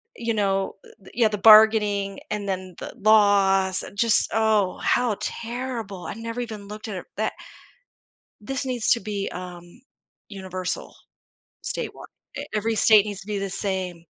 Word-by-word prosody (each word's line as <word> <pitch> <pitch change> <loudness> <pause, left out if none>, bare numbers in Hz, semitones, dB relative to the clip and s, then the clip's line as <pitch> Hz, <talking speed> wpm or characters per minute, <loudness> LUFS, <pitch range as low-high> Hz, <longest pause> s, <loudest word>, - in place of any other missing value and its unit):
you 230 -1 -2
know, 195 -2 0
eh, - - -16
the 190 - -16
yeah, 230 -1 +3
the 210 -1 -3
bargaining 210 -2 +5
and 210 -1 -3
then 185 -1 -4
the - - -7
loss, 200 -3 +4
and 200 - -11
just 230 0 +3
Oh, 215 -3 +2
how 240 -4 +1
terrible, 230 -5 -5
I - - -4
never 230 +2 -5
even 215 -4 -7
looked 210 +2 -8
at 210 - -5
it - - -8
that - - -1 1.1
This 270 +5 -4
needs 250 -3 -1
to 235 - +4
be, 200 -1 -4
um, 180 +4 -9 0.5
universal. 185 -2 -5 0.7
Statewi - - -5 0.3
eh - - -4
every 220 +2 0
state 215 -1 +6
needs 205 -2 -5
to 195 - -14
be 210 -1 -2
the 195 0 -3
same. 185 -3 -3
205 Hz, 160 wpm, -24 LUFS, 195-220 Hz, 1.1 s, state